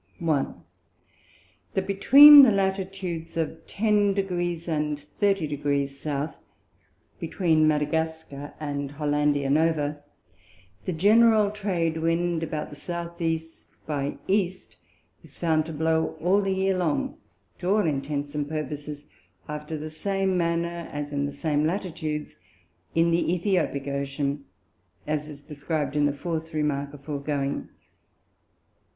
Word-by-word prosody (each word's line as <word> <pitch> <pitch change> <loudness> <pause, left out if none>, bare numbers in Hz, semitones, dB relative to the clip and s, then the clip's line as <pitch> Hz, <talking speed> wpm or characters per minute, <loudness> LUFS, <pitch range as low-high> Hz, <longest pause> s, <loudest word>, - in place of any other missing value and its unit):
1. 160 -6 -1 1.1
That 190 - 0
between 280 +9 +10
the 260 -5 +7
Latitudes 190 -4 -2
of 160 0 -3
ten 205 -2 +2
Degrees 175 -3 -2
and 150 -2 -1
thirty 195 +5 0
Degrees 140 -1 -2
South, 150 0 -3 0.8
between 160 -4 +2
Madagascar 150 -1 -2
and 145 -2 -4
Hollandia 145 -1 +1
Nova, 150 -1 +1 0.8
the - - -1
general 215 +4 +5
Trade 180 -6 -1
Wind 165 +1 0
about 155 -2 -4
the 145 +4 -8
S. 170 0 -4 0.5
E. - - -36
by 145 -2 -2
E. 190 -2 +2 0.7
is - - -16
found 160 -2 +1
to - - -5
blow 160 +1 0
all 185 +5 +3
the 195 - -1
Year 190 0 +1
long, 175 -5 -1 0.4
to 180 - -2
all 210 0 +3
Intents 145 -1 -2
and 145 -1 -2
Purposes 150 -1 -5 0.4
after 150 +1 -5
the 155 +1 -6
same 195 +3 -1
manner 170 0 -1
as 145 0 -5
in 140 0 0
the - - -5
same 145 +1 0
Latitudes 160 -3 -3 0.6
in 165 +1 +3
the 170 +1 +2
Æthiopick 175 -6 0
Ocean, 140 0 -2 0.6
as 150 0 -2
it - - -8
is 140 - -12
describ'd 145 -1 -3
in 145 -1 +3
the 145 - +2
fourth 160 +2 -4
Remark 145 -2 -1
aforegoing. 140 -1 -3
160 Hz, 130 wpm, -26 LUFS, 145-175 Hz, 1.1 s, between